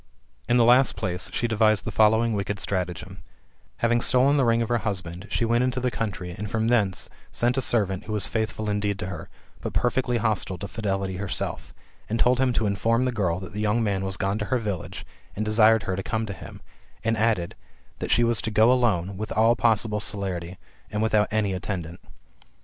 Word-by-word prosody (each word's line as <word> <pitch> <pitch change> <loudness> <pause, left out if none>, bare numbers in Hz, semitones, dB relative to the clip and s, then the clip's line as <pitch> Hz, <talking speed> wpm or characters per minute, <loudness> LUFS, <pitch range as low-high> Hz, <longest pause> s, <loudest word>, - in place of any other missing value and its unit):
In 120 - +4
the 120 - +5
last 125 +3 +5
place, 90 0 -3
she 120 - 0
devised 110 -2 +2
the - - -3
following 110 +1 +3
wicked 100 0 -2
stratagem: 95 0 -3 0.7
having 120 0 +2
stolen 135 +4 +4
the 135 -3 +3
ring 115 0 +3
of 115 - -5
her 120 -1 +2
husband, 90 -3 -4
she 115 - 0
went 120 +2 +2
into 130 0 0
the 125 0 -1
country, 95 -6 -4
and 105 +2 -5
from 110 +1 0
thence 105 -6 +1 0.2
sent 120 +1 +1
a 135 - +1
servant, 100 -7 0
who - - -6
was 105 -2 +1
faithful 110 -1 -2
indeed 105 -1 -1
to 95 - -4
her, 95 0 -7 0.3
but - - -4
perfectly 125 0 +1
hostile 105 -4 -1
to 100 - -6
Fidelity 95 -4 -2
herself, 100 -1 -4 0.4
and 115 +2 -1
told 125 +1 +3
him 130 -1 +3
to 115 -2 0
inform 115 +5 +1
the 130 - +1
girl 90 -7 -1
that 95 -1 -9
the 105 - -3
young 110 +2 +1
man 100 -3 0
was 95 -1 -3
gone 100 +2 -1
to 105 - -2
her 115 +5 +1
village, 105 -8 -5 0.3
and 110 - -2
desired 110 +1 +5
her 95 - -2
to 95 - -3
come 110 +3 -2
to 100 - -5
him; 85 - -11 0.4
and 115 0 +1
added, 110 -6 0 0.5
that - - -4
she 120 - +4
was 120 -1 +2
to - - -2
go 110 +2 +4
alone, 100 -7 +1
with 110 +1 -5
all 115 +2 +4
possible 110 -2 +1
celerity, 95 -4 -3 0.3
and 105 +1 -1
without 105 -1 +3
any 105 -2 0
attendant. 90 -3 -5
105 Hz, 210 wpm, -25 LUFS, 95-115 Hz, 0.7 s, the